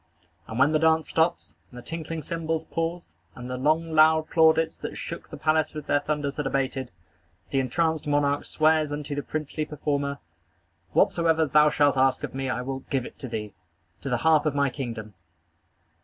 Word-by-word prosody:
And 110 - -6
when 140 +3 +4
the 155 - +2
dance 160 0 +3
stops, 165 +1 0
and 125 - -13
the 120 - -9
tinkling 165 +1 -5
cymbals 165 -1 -2
pause, 165 +1 -4 0.2
and 125 -1 -8
the - - -2
long, 155 +5 +1
loud 160 0 +4
plaudits 160 -1 +3
that - - -6
shook - - -7
the - - -8
palace 155 0 +1
with 150 -2 -6
their 145 - +2
thunders 145 -1 -3
had 150 -2 -1
abated, 135 -1 -1 0.6
the 135 - +2
entranced 160 +4 0
monarch 145 -1 +1
swears 155 -1 +2
unto 145 0 -4
the 145 - -2
princely 155 +1 -4
performer: 145 -2 -2 0.8
"Whatsoever 165 -1 +3
thou 150 +1 +5
shalt 145 -2 +2
ask 130 0 +2
of - - -4
me 135 0 -3
I 125 - -1
will 135 +1 -4
give 135 -3 -1
it - - -11
to 130 - -6
thee, 110 -3 -5 0.5
to 135 - -4
the 125 - +1
half 155 -1 +4
of 145 - -1
my 140 -2 +2
kingdom." 115 -6 -6
150 Hz, 185 wpm, -26 LUFS, 135-160 Hz, 0.8 s, thou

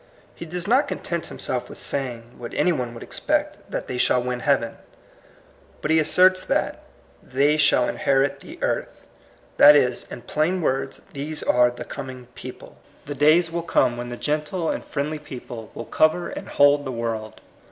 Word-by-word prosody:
He 170 - -9
does 175 +2 -3
not 265 +6 +4
con - - -3
tent 170 -2 -4
himself 125 -2 -3
with - - -9
saying, 120 -4 -2
what 120 -1 -7
any 180 - +3
one 125 -6 -3
would 115 - -8
expect, - - -1
that - - -3
they 125 - -4
shall 125 - +3
win 125 0 -2
heaven. 125 -3 +1 1.0
But 150 - -2
he 160 - +5
asserts 185 +4 +4
that - - 0
^' - - -22 0.5
they 140 +3 +3
shall 135 -4 +4
inherit 135 0 +1
the - - -11
earth." - - -2 0.5
That 150 +1 +9
is, 125 -4 +1
in 120 - -8
plain 165 +5 0
words, 135 -4 -1
these 150 +2 -4
are 125 0 +4
the 120 - -8
coming 130 -3 -7
people. - - -10 0.3
The 145 - -4
days 155 +4 +4
will 170 0 -2
come 125 -7 +2
when 120 0 -6
the 120 - -6
gentle 150 +4 -1
and - - -4
friendly 150 +1 -3
people 120 -6 -9
will 115 - -6
cover 155 +8 +2
and - - -7
hold 145 0 +4
the 135 - -4
world. 115 -2 -4
140 Hz, 185 wpm, -23 LUFS, 125-155 Hz, 1.0 s, That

